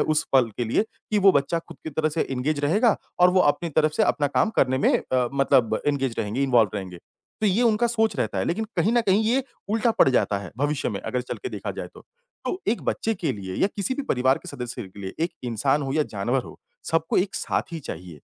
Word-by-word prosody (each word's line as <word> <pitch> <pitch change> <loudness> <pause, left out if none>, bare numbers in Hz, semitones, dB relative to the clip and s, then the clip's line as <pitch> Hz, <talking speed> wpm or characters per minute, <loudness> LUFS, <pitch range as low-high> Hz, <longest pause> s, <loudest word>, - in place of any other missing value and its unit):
उस 155 -1 +2
पल 130 -4 +5
के 120 - -1
लिए 115 - +2 0.3
कि 210 - +2
वो 195 -1 +6
बच्चा 140 +3 +1
खुद 165 -1 -12
की 160 - -4
तरह 155 +2 0
से 155 +1 -1
इंगेज 145 +3 -1
रहेगा। 205 +10 +3 0.2
और 180 0 +7
वो 185 0 +3
अपनी 165 +3 +2
तरफ़ 155 0 +2
से - - +1
अपना 145 - +2
काम 145 +9 +1
करने 130 0 +3
में - - +3 0.2
अ, 125 -2 +2
मतलब 135 -4 +3
इंगेज 135 -4 0
रहेंगे, 110 +5 -1
इन्वॉल्व 120 -6 +4
रहेंगे, 95 -3 -5 0.4
तो 215 - +2
ये 205 +5 +2
उनका 230 0 +3
सोच 225 -2 +1
रहता 105 -4 -1
है 95 - 0
लेकिन 220 +6 -1
कहीं 220 - +2
न 240 - +4
कहीं 210 -1 +2
ये 255 +4 +2 0.3
उल्टा 225 +2 +2
पड़ - - +7
जाता 105 -5 +2
है 100 -3 -8
भविष्य 145 +1 0
में 100 - -4
अगर 125 - -2
चल 125 - -5
के 385 - -3
देखा - - -5
जाए - - -4
तो। - - -13 0.4
तो 370 - -3
एक 230 - 0
बच्चे 225 - -1
के 165 -8 -2
लिए 95 -4 -6
या - - +6
किसी 200 +5 -1
भी 285 - -3
परिवार 130 +1 +2
के - - -12
सदस्य 125 -2 -6
के 95 0 -12
लिए, 95 -1 -5
एक 170 +1 +1
इंसान 135 +5 +1
हो 135 -1 -3
या 155 0 +2
जानवर 120 +3 -1
हो, - - -12 0.3
सबको 165 -1 0
एक 190 +1 0
साथी 165 - -2
चाहिए, 85 - -8
145 Hz, 240 wpm, -24 LUFS, 125-190 Hz, 0.4 s, और